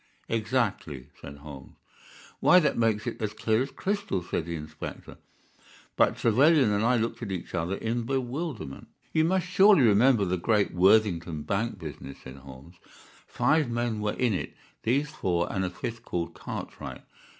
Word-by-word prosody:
"Exactly," 105 - -1
said 70 +1 -9
Holmes. 70 -2 -11 0.6
"Why, 180 - +6
that 150 - +1
makes 110 -2 +1
it - - -5
as 105 -1 -2
clear 110 +1 +1
as 135 - -2
crystal," 195 - -2
said 85 -1 -3
the 85 - -3
inspector. 75 0 -8 0.8
But - - +3
Trevelyan 135 +2 +4
and 105 +1 +1
I 125 +2 +3
looked 115 +2 -2
at 110 -4 -4
each 90 -3 -5
other 85 +2 -1
in 115 +3 -2
bewilderment. 130 - -4 0.3
"You 160 0 +3
must 185 +1 +1
surely 190 -3 +5
remember 115 0 +4
the 90 0 0
great 105 +3 +1
Worthingdon 90 -5 +3
bank 105 +5 -2
business," 75 -5 -8
said 65 +1 -10
Holmes. 70 +5 -13 0.5
"Five 155 -5 +1
men 120 -2 -1
were 105 0 -1
in 125 -4 +1
it—these 135 +8 -3
four 90 - -1
and 95 - -1
a 95 - -1
fifth 115 +6 -6
called 85 -6 -3
Cartwright. - - -7
110 Hz, 160 wpm, -27 LUFS, 85-125 Hz, 0.8 s, Why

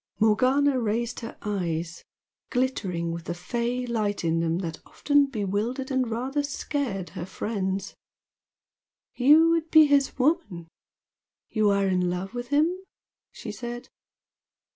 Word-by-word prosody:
Morgana 255 +5 +3
raised 230 +1 -1
her 230 -1 -8
eyes, 175 -5 -3 0.5
glittering 190 -10 -1
with 170 0 -6
the 170 - -3
"fey" 240 +7 -2
light 215 -5 -1
in 165 0 +1
them 165 0 0
that 165 -3 -5
often 290 -1 +2
bewildered 230 +3 -2
and 260 -2 +1
rather 260 +6 -1
scared 280 - -3
her - - -6
friends. 195 0 -3 1.2
"You 305 +6 +6
would 330 -1 0
be 315 -1 +8
his 285 -2 +2
woman? 260 - 0 0.8
You 215 -2 +3
are 200 -1 +2
in 180 -1 +1
love 180 +4 -4
with 245 0 -5
him?" 305 +6 +2 0.6
she - - -7
said. 240 +1 -7
230 Hz, 130 wpm, -26 LUFS, 190-270 Hz, 1.2 s, be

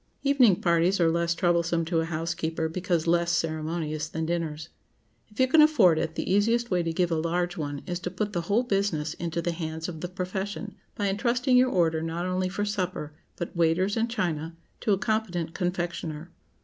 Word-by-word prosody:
Evening 260 -9 +4
parties 170 +2 +3
are 165 -1 +4
less 170 0 +1
troublesome 170 -1 +1
to 165 0 0
a 160 - 0
housekeeper, 165 0 -2
because 175 -1 -1
less 170 0 +2
ceremonious 155 -1 -2
than 160 0 -3
dinners. 160 -2 -3 0.6
If 210 - -17
you 260 - +5
can 305 +4 +6
afford 220 - +5
it, 160 -1 -2
the - - -3
easiest 230 +4 +2
way 180 -1 +2
to 165 -1 -1
give 175 +1 0
a - - +2
large 175 +2 -1
one 145 -4 -4
is 175 -1 -3
to 180 - -4
put 210 +2 -3
the 175 - 0
whole 205 +8 +1
business 195 -9 0
into 170 0 -3
the 175 - 0
hands 160 -1 -4
of 160 -3 -7
the 180 - -2
profession, 195 +3 -4 0.2
by 205 - -2
intrusting 245 +6 +1
your 255 +1 +5
order, 165 -6 +2
not 165 +2 -3
only 185 0 0
for 205 +2 -2
supper, 185 -7 -3 0.2
but 170 - -5
waiters 170 +4 +2
and 230 +1 0
china, 165 -7 -2 0.2
to 215 - 0
a 195 - +4
competent 185 -6 -1
confectioner. 175 -3 -3
175 Hz, 195 wpm, -27 LUFS, 165-195 Hz, 0.6 s, can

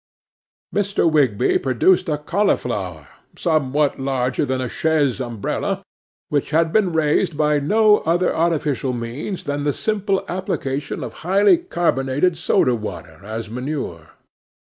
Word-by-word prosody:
'MR. 200 -4 +1
WIGSBY 130 -7 +2
produced 165 - +2
a 150 - 0
cauliflower 120 - -1 0.3
somewhat 150 -3 +1
larger 130 0 0
than 130 0 -1
a 130 - -2
chaise 145 -2 +1
umbrella, 120 -5 -3 0.5
which 145 -2 0
had 160 +2 +1
been 205 -5 +3
raised 160 +1 +1
by 150 -1 +2
no 210 +8 +4
other 175 +3 +1
artificial 150 -6 0
means 120 - -5
than 145 0 -2
the 145 0 +1
simple 200 +3 -1
application 145 -6 -3
of - - -6
highly 200 - +4
carbonated 165 - 0
soda 155 -5 +2
water 110 -2 -6
as 110 +2 -5
manure. 125 - -5
150 Hz, 125 wpm, -21 LUFS, 130-175 Hz, 0.5 s, no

